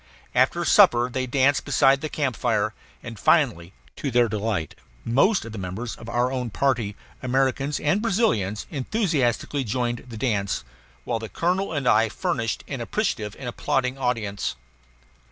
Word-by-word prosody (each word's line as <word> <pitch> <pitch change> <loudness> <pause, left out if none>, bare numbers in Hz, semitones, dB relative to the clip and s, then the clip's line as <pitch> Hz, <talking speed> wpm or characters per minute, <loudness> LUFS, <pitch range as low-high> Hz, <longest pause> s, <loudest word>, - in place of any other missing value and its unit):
After - - +2
supper 120 +1 +5
they 130 +1 -2
danced 135 +2 +2
beside 135 0 +3
the 155 - -3
camp 140 -6 -1
fire; 110 -3 0 0.3
and 115 -4 -8
finally, 105 - +2 0.3
to 145 - -2
their 120 -1 +3
delight, 105 -6 -2 0.3
most 155 - +3
of 115 - -7
the 110 - -6
members 95 +6 -5
of 115 - -10
our 120 +2 +1
own 125 -2 -2
party, 120 -4 0 0.3
Americans 135 +2 0
and 170 +8 +1
Brazilians, 150 - +1
enthusiastically 145 - 0
joined 120 +1 -2
the 115 - -7
dance, 105 - -1 0.4
while 115 - -2
the 110 -1 -7
colonel 185 +3 0
and 145 -5 -2
I 110 0 +4
furnished 115 - -2
an 135 -4 -4
appreciative 115 - -2
and 135 - -6
applauding 125 +2 -1
audience. 115 -6 -1
125 Hz, 155 wpm, -24 LUFS, 110-140 Hz, 0.4 s, supper